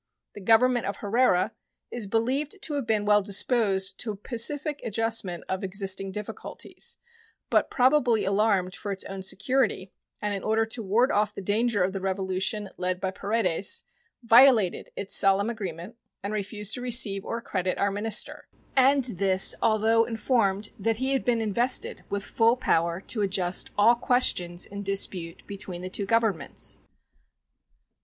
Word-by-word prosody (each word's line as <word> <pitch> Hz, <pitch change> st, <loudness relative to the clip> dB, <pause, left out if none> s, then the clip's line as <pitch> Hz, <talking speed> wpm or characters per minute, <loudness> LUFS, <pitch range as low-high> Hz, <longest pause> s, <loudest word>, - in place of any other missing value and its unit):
The 205 Hz, -, -10 dB
Government 235 Hz, +4 st, +3 dB
of 200 Hz, -, -3 dB
Herrera 210 Hz, -2 st, +2 dB, 0.4 s
is 235 Hz, -4 st, -5 dB
believed 260 Hz, -, -1 dB
to 305 Hz, -, -2 dB
have 280 Hz, -5 st, -2 dB
been 215 Hz, -2 st, +1 dB
well 210 Hz, 0 st, +4 dB
disposed 200 Hz, -1 st, +1 dB
to 235 Hz, -, -1 dB
a -, -, -6 dB
pacific 275 Hz, +8 st, -1 dB
adjustment 225 Hz, -5 st, -2 dB
of 190 Hz, +1 st, -3 dB
existing 195 Hz, 0 st, 0 dB
difficulties, 210 Hz, +1 st, -6 dB, 0.5 s
but -, -, +3 dB
probably 250 Hz, -4 st, +3 dB
alarmed 195 Hz, -2 st, +1 dB
for 205 Hz, -, -6 dB
its 195 Hz, -, -2 dB
own 195 Hz, 0 st, -7 dB
security, 215 Hz, 0 st, -1 dB, 0.3 s
and 210 Hz, 0 st, -2 dB
in 195 Hz, -, -3 dB
order 220 Hz, +2 st, +1 dB
to 225 Hz, +1 st, -4 dB
ward 225 Hz, +7 st, +2 dB
off 210 Hz, 0 st, 0 dB
the -, -, -6 dB
danger 210 Hz, 0 st, +1 dB
of 190 Hz, +1 st, -1 dB
the 195 Hz, -, -4 dB
revolution 190 Hz, +1 st, -1 dB
led 180 Hz, 0 st, -2 dB
by 190 Hz, 0 st, -2 dB
Paredes, 200 Hz, -3 st, 0 dB, 0.4 s
violated 230 Hz, -5 st, +5 dB
its 195 Hz, -, -2 dB
solemn 200 Hz, +3 st, +3 dB
agreement 195 Hz, -1 st, -7 dB, 0.3 s
and 200 Hz, +1 st, -3 dB
refused 210 Hz, 0 st, -2 dB
to 245 Hz, -, -3 dB
receive 230 Hz, -5 st, +1 dB
or 230 Hz, -, -4 dB
accredit 185 Hz, -5 st, -2 dB
our 200 Hz, 0 st, +1 dB
minister; 210 Hz, +2 st, -2 dB, 0.3 s
and 270 Hz, +1 st, +5 dB
this 195 Hz, -5 st, +2 dB
although 225 Hz, +1 st, +3 dB
informed 215 Hz, -3 st, 0 dB
that 225 Hz, +3 st, 0 dB
he 265 Hz, +3 st, 0 dB
had 270 Hz, -, 0 dB
been 235 Hz, -2 st, +1 dB
invested 235 Hz, +4 st, 0 dB
with 200 Hz, 0 st, -2 dB
full 230 Hz, +3 st, +2 dB
power 170 Hz, -5 st, 0 dB
to 215 Hz, +2 st, -3 dB
adjust 185 Hz, -2 st, 0 dB
all 215 Hz, +3 st, +6 dB
questions 210 Hz, -8 st, 0 dB
in 200 Hz, 0 st, -7 dB
dispute 190 Hz, -4 st, -3 dB
between 190 Hz, -3 st, -5 dB
the 185 Hz, -, -4 dB
two 200 Hz, 0 st, -3 dB
Governments. 225 Hz, -10 st, -1 dB
210 Hz, 155 wpm, -26 LUFS, 195-230 Hz, 0.5 s, all